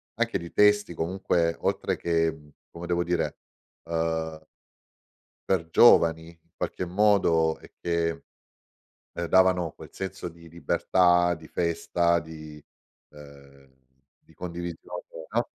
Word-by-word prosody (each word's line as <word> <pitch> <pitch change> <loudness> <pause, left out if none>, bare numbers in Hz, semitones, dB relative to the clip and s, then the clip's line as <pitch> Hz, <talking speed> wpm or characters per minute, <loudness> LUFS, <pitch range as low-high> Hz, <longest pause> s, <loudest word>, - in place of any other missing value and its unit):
anche - - 0
di 85 0 -9
testi, 105 -2 +4
comunque 85 0 0
oltre - - 0
che, 80 -1 +1
mhmm, 75 -2 -16 0.2
come 85 +1 -9
devo 85 0 0
dire, 90 0 -1 0.5
uhm 80 -1 -2 1.1
per 90 -4 +1
giovani, 80 -8 +5
in 85 0 -21
qualche 90 - -3
modo 90 -4 +3
e - - -17
che, 85 -1 -1 0.9
ehm, 85 - -4
davano 90 -2 +3
quel - - -12
senso 95 -1 -6
di 85 0 -16
libertà, 90 +1 +2
di 80 - -14
festa, 85 0 +1
di 75 -2 -11 0.5
ehm, 70 -2 -16 0.5
di - - -24
condivisione, 85 0 -7 0.3
no? - - +1
85 Hz, 120 wpm, -26 LUFS, 80-90 Hz, 1.1 s, giovani